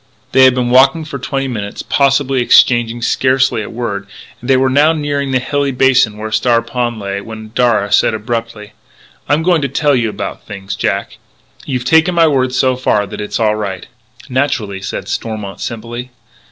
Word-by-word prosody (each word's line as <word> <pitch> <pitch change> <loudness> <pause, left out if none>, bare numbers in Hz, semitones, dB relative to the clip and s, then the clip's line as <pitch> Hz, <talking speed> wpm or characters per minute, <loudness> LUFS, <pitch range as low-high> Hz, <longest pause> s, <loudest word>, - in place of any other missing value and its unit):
They 130 0 +6
had 130 -1 +4
been 125 -1 -1
walking 135 +5 +4
for 140 -2 -6
twenty 135 +1 -3
minutes, 105 -5 -5
possibly, 135 -1 +1
exchanging 120 -1 +3
scarcely 130 -2 +1
a 105 - -6
word, 100 -4 -4 0.3
and 120 - -8
they 135 - +5
were 130 +1 +2
now 145 +5 +4
nearing 145 -2 -2
the 130 - +2
hilly 140 +2 -1
basin 130 -4 +2
where 110 0 -6
Star 115 0 +2
Pond 120 0 -2
lay, 100 -1 -4
when 110 0 -9
Darragh 110 -5 +1
said - - +3
abruptly: 115 -1 -5 0.6
"I'm 150 +2 +2
going 175 -2 +2
to 140 - 0
tell 145 +1 +1
you 115 -3 0
about - - -6
things, 100 -1 -7
Jack. - - -2 0.5
You've 125 -3 -3
taken 160 +6 +3
my 165 -1 +5
word 130 -4 +1
so 130 0 +1
far 105 -5 0
that - - -7
it's 105 - -4
all 105 -2 +2
right 100 -4 -5 0.3
" - - -20
"Naturally," 125 -7 -1
said 95 - -5
Stormont 105 -4 -5
simply. 120 +2 -6
125 Hz, 185 wpm, -15 LUFS, 110-135 Hz, 0.6 s, They